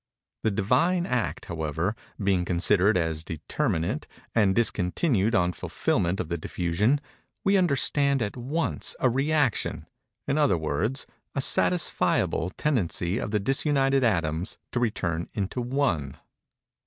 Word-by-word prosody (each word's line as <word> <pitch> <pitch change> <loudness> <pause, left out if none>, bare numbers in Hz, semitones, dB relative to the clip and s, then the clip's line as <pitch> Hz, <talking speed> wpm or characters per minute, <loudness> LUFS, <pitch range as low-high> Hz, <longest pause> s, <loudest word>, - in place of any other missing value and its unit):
The 110 - +2
Divine 130 - +2
Act, 125 -6 -2
however, 80 +4 -2 0.2
being 95 -3 +1
considered 90 +3 +3
as 80 -2 -1
determinate, 80 0 -2 0.3
and 100 -4 +3
discontinued 115 - +1
on 90 -3 +2
fulfilment 85 +2 -1
of 85 - -2
the 85 0 -3
diffusion, 95 - 0 0.4
we 195 +1 +3
understand, 140 -5 +3
at 105 -4 -2
once, 140 +7 -1
a 130 - +3
rëaction—in 135 +1 -1
other 100 - +3
words, 85 - -1 0.3
a - - 0
satisfiable 140 - +2
tendency 100 - 0
of - - -3
the 105 0 +1
disunited 135 +3 +2
atoms 85 -5 0
to 120 - -1
return 85 -8 -1
into 105 +4 -2
One. 120 - -1
105 Hz, 120 wpm, -26 LUFS, 85-135 Hz, 0.4 s, considered